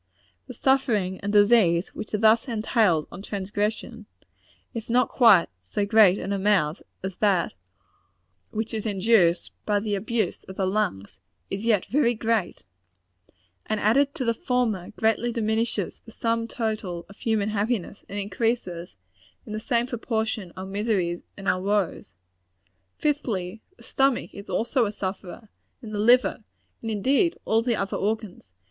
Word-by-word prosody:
The - - -9
suffering 220 -9 +1
and 205 - -2
disease 205 -5 +4
which - - -7
are - - +1
thus 220 +4 +4
entailed 215 - +1
on - - -8
transgression, 210 +3 -3 0.7
if 230 0 -6
not 250 +2 +3
quite 220 -9 +6
so 90 - -2
great 205 -3 +6
in 195 +1 -3
amount 190 -6 +1 0.2
as 190 -1 -5
that 195 -5 +2 1.0
which 220 +1 -4
is 220 0 -2
induced 195 -4 +3
by 205 -1 +1
the 210 0 -3
abuse 215 0 -1
of 190 - -9
the 190 - 0
lungs, 185 - -2 0.3
is 195 +3 -3
yet 215 -5 +3
very 245 -3 +2
great 220 -4 -1 1.0
and 215 -1 -1
added 270 +7 +3
to 255 - -2
the 230 - +2
former, 225 -6 -1
greatly 225 +2 0
diminishes 220 -3 -1
the 225 - -13
sum 230 0 -1
total 215 -8 -3
of 200 - -15
human 215 -2 0
happiness, 210 -2 -2
and 200 - -5
increases, 195 - -2 0.5
in 215 - -7
the 215 - -2
same 235 +1 0
proportion, 220 -5 -2
our 185 - -5
miseries 195 -3 -1 0.2
and 200 -1 -7
our 185 - +2
woes. 195 - -1 0.8
Fifthly 220 -10 -2 0.2
the - - -17
stomach 270 -2 +1
is 200 +1 -10
also 235 0 +1
a - - -3
sufferer 195 +1 -6 0.3
and 215 -1 -7
the 205 - -2
liver; 240 +1 +4 0.4
and, 225 - -4
indeed, 270 - +2
all 225 +1 +3
the 235 0 0
other 195 -1 -2
organs. 205 - -3
215 Hz, 150 wpm, -25 LUFS, 195-230 Hz, 1.0 s, quite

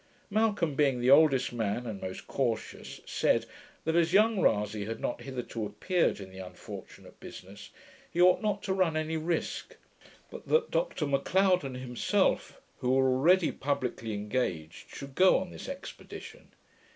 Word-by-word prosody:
Malcolm, 205 -7 +1
being 135 -3 +2
the 125 +2 +3
oldest 140 -4 +5
man, 115 +1 -2
and 105 -4 -6
most 95 - -6
cautious, 120 -5 -3
said, - - +1 0.4
that 160 +1 +1
as 170 0 +3
young 215 +1 +4
Rasay 105 -1 +1
had 115 +1 -5
not - - -3
hitherto 125 -4 -5
appeared 175 - 0
in 95 -1 -9
the 95 - -11
unfortunate 90 -1 -10
business, 100 +2 -11 0.4
he 170 - -4
ought 180 +1 +6
not 210 -2 -1
to 190 - -1
run 180 -4 +1
any 155 +1 -2
risk; 160 +1 -2 0.6
but - - -10
that 470 0 +2
Dr - - 0
Macleod 180 +6 +2
and 130 -2 -5
himself, 125 -1 0 0.2
who 125 - -1
were 130 0 +4
already 170 +7 +4
publickly 125 -5 -2
engaged, 100 -7 -3
should 140 -1 -9
go 185 +6 +5
on 185 -1 -4
this - - -8
expedition. 445 - -9
140 Hz, 155 wpm, -30 LUFS, 115-180 Hz, 0.6 s, ought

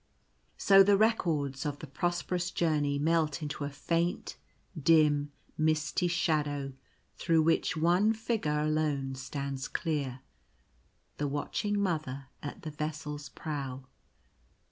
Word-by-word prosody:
So 195 -1 +7
the 200 +1 +5
records 160 - +1
of 145 -2 -2
the 155 - -8
prosperous 175 +3 -1
journey 150 -5 +1
melt 155 -1 +1
into 145 -1 -3
a - - -3
faint, 170 +4 -1 0.4
dim, 150 -2 +3 0.3
misty 155 +3 +1
shadow 150 -5 0 0.4
through 165 -2 +3
which 165 0 +2
one 175 +7 +4
figure 215 -10 -1
alone 150 -3 0
stands 135 0 -4
clear 140 -6 -2 0.5
— 65 -2 -40
the 145 - 0
watching 205 +8 -1
Mother 150 -8 -2
at 145 - -7
the 155 - -5
vessel's 150 -1 -5
prow. 135 -4 -5
155 Hz, 120 wpm, -30 LUFS, 145-170 Hz, 0.5 s, So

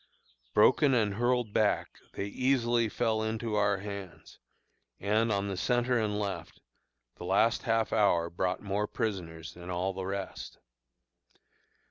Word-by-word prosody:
Broken 135 +5 +5
and 105 -4 +2
hurled 120 0 0
back, 105 -1 +1
they 100 - -3
easily 120 0 +1
fell 110 -1 0
into 110 0 -2
our 100 -1 +2
hands; 100 -2 -8 0.6
and, 110 +3 +1
on 100 -1 0
the 100 - -3
centre 120 +4 +1
and 105 -2 -1
left, 100 -2 -4 0.6
the - - -8
last 100 +5 +3
half 115 -2 0
hour 85 -5 +3
brought 90 +2 -1
more 100 +1 -1
prisoners 85 -8 -4
than 90 0 -10
all 90 +2 -1
the 95 0 -5
rest. 100 0 -5
105 Hz, 135 wpm, -30 LUFS, 95-115 Hz, 0.6 s, Broken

